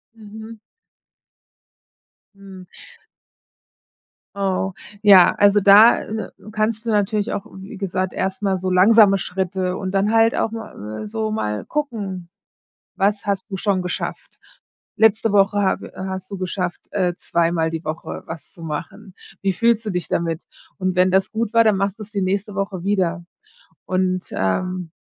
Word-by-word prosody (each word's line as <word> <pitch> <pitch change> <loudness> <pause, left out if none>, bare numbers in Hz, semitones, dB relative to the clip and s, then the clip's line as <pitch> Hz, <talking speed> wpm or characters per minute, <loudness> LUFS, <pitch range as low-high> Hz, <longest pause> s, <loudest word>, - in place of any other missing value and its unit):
Mhm. 220 +1 -11 1.8
Mhm. 195 -2 -12 1.7
Oh, 195 -1 -1 0.3
ja. 195 -4 +7
Also, 205 0 +5
da, 205 +4 +7
äh, 220 0 -5 0.2
kannst 215 +1 -1
du - - -2
natürlich 210 +1 0
auch 200 - -4
wie 190 +1 -9
gesagt, 185 -1 -2
erstmal 190 +1 -1
so 185 +1 -3
langsame 195 +2 +6
Schritte. 185 0 -2
Und 190 -1 -4
dann 200 +2 +1
halt 225 0 +4
auch 220 - 0
ma 225 -1 -7
mal 110 - -7
so 220 0 -3
mal 105 - -3
gucken, 205 -12 -4 0.7
was 200 +1 0
hast 200 -2 -1
du 195 - -4
schon 190 -1 0
geschafft? 180 0 -5 0.6
Letzte 220 0 +3
Woche 200 0 +3
habe 195 - 0
i - - -20
hast 190 0 -5
du 200 - -6
geschafft, 180 -1 -3
äh, 185 -3 0
zweimal 165 -1 0
die 165 0 -5
Woche 155 +1 -5
was 165 -1 -9
zu 170 - -13
machen. 170 +6 -7 0.3
Wie 195 -1 +1
fühlst 230 +4 +2
du 210 - -2
dich 180 -2 -3
damit? 165 0 -1 0.3
Und 185 -2 -1
wenn 180 +1 +4
das 190 +2 +2
gut 225 0 -2
war, 230 0 +6
dann 215 -3 +3
machst 195 +2 -2
du - - -6
es 210 - -12
die 200 -2 -2
nächste 200 +2 -1
Woche 195 -2 -3
wieder. 185 -3 0 0.6
Und, 185 0 -1
ähm, 180 - -2
195 Hz, 155 wpm, -21 LUFS, 185-210 Hz, 1.8 s, ja